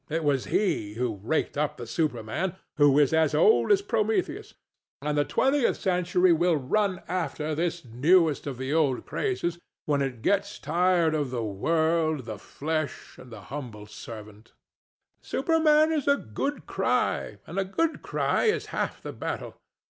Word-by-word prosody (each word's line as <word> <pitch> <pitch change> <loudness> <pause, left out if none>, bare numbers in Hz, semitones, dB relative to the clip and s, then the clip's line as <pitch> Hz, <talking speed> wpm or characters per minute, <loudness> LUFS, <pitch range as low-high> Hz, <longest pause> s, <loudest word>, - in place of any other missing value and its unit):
It 160 +1 -1
was 140 -3 +1
he 105 - 0
who 115 -4 -2
raked 145 +5 -1
up 150 -1 -1
the 120 - -6
Superman, 125 - -2 0.2
who 145 -2 +5
is 145 0 +4
as 160 -2 +3
old 435 - +4
as 400 -1 +4
Prometheus; 225 - -1 0.4
and 150 +1 -2
the 145 - +3
20th 270 - +2
century 180 -1 +2
will 170 +1 +2
run 185 +7 0
after 155 -3 -2
this 170 0 -2
newest 150 +7 +3
of 135 -3 -4
the 130 +3 -3
old 145 -6 +1
crazes 175 - -2 0.3
when 145 -2 +1
it 125 -4 -3
gets 200 +1 +1
tired 175 -2 +2
of 145 -4 -1
the 120 -2 -3
world, 160 +6 0
the 110 -3 -6
flesh, 155 +6 -4
and 125 - -13
your 110 -2 -9
humble 120 -4 -7
servant. 105 0 -11 0.7
THE - - -22
STATUE. - - -3
Superman 315 -1 +4
is 300 -4 -1
a 280 0 +5
good 275 - -4
cry; - - 0
and - - -4
a - - +2
good 315 - -1
cry - - 0
is 435 - +1
half - - -3
the - - -6
battle. - - -5
160 Hz, 165 wpm, -27 LUFS, 130-185 Hz, 0.7 s, who